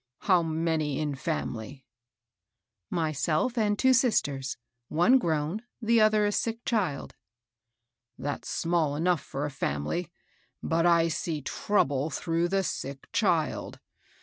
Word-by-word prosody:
How 185 -3 +4
many 160 -3 -1
in 150 -2 -1
family?" 135 -3 -4 0.5
" 90 +6 -60 0.2
Myself 160 - 0
and 210 -3 +1
two 260 +2 +4
sisters, 145 - +1 0.2
— 125 - -54
one 175 +12 +4
grown, 160 +1 -1 0.2
the 230 -1 +3
other 215 -1 +4
a 205 - +1
sick 230 +2 -2
child." 185 - -1 0.6
" 115 0 -56 0.3
That's 145 0 -4
small 165 -4 0
enough 170 +1 +1
for 140 +2 -4
a 150 - -4
family; 135 - -2 0.5
but 165 +1 +2
I 170 -1 +4
see 160 -2 -3
trouble 145 -5 0
through 165 +3 0
the 195 +2 +1
sick 140 -5 -5
child. 175 -7 0
165 Hz, 135 wpm, -28 LUFS, 145-195 Hz, 0.6 s, How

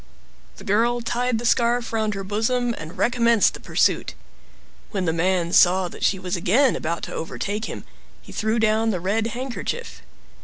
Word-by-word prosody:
The - - -11
girl 235 +4 +1
tied 240 +1 -1
the 235 - -5
scarf 235 0 +1
round 215 -2 0
her 195 - -4
bosom 235 +5 0
and 160 +5 -9
recommenced 235 -3 +3
the - - -9
pursuit. - - 0 0.7
When 195 -4 -2
the 160 - +1
man 175 0 0
saw 180 0 +5
that - - -9
she 195 - +2
was 185 -1 -3
again 230 +10 +3
about 165 +1 -3
to - - -5
overtake 205 +6 -4
him, - - -7 0.4
he - - -14
threw 220 +1 -1
down 220 0 +2
the 190 -5 -1
red 210 +5 0
handkerchief. 260 - -5
220 Hz, 170 wpm, -23 LUFS, 185-235 Hz, 0.7 s, saw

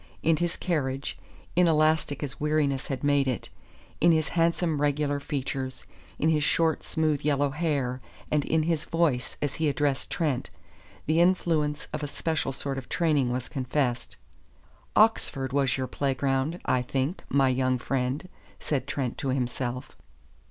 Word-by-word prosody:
In 160 0 +4
his 175 0 -1
carriage, 140 -6 -1 0.4
inelastic 155 -4 +3
as 135 -2 -5
weariness 150 -2 +1
had 135 -1 -4
made 145 -1 +3
it, 125 -3 -2 0.5
in 170 - +6
his 155 -2 +2
handsome, 165 -2 +1
regular 145 0 +1
features, 135 -2 -4 0.3
in 160 - +2
his 155 -2 +2
short, 160 +1 +2
smooth 155 -2 0
yellow 145 -1 +1
hair 140 -5 -1 0.3
and 150 -1 +2
in 160 +2 +1
his 160 -1 0
voice 165 -7 0
as 145 -2 -1
he 155 - +3
addressed 140 0 0
Trent, 145 -7 -1 0.6
the 160 +2 +2
influence 160 -5 +2
of 155 - -2
a 145 - -2
special 160 -1 -1
sort 135 0 -3
of 130 - -12
training 150 -7 +2
was 125 0 -2
confessed. 130 -2 -1 0.8
"Oxford 140 -11 +3
was 135 -3 +2
your 130 - -1
playground, 135 +4 0
I 130 -1 +2
think, 135 +7 -2
my 135 -1 +4
young 130 0 +1
friend," 130 +6 -2 0.3
said 140 -3 -2
Trent 130 -4 -2
to 135 - -2
himself. 125 -1 -2
145 Hz, 150 wpm, -27 LUFS, 130-155 Hz, 0.8 s, in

